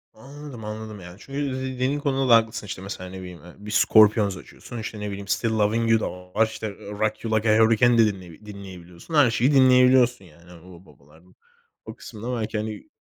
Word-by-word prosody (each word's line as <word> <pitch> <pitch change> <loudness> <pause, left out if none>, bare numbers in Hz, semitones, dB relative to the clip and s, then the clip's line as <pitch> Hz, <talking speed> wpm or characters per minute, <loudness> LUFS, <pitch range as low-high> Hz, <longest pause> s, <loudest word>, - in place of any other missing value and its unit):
Anladım, 135 -1 -11
anladım. 110 -1 -7
Yani, 90 0 -11
çünkü 135 +5 -7 0.2
dediğin 130 +2 -2
konuda 135 -2 -1
da 115 - +8
haklısın 110 -1 0
işte 95 -1 -7
mesela 95 -1 -7
ne 95 - -9
bileyim, 90 -2 -10
eee, 90 - -13
bir 105 +1 -9
Scorpions 105 -2 +4
açıyorsun, 120 - -11
işte 110 -1 -7
ne 105 - -4
bileyim, 100 0 -7
Still 115 +3 0
Loving 110 +1 +1
You 115 - +4
da - - -3 0.3
var, 110 - +6
işte 110 0 -6
Rock 105 +2 -4
You 110 -1 -1
Like 110 0 0
A 110 - +4
Hurricane 115 +2 +4
de 115 - +6
dinley 95 -2 -6
dinleyebiliyorsun. 95 - -11
Her 145 -6 +5
şeyi 125 +5 +2
dinleyebiliyorsun, 125 -4 +4
yani. 85 +1 -19
O 90 0 -15
babalar 75 +2 -21 0.6
o - - -9
kısımda 115 +4 -7
belki, 110 0 -3
hani, 110 -1 -6
110 Hz, 200 wpm, -24 LUFS, 100-120 Hz, 0.6 s, da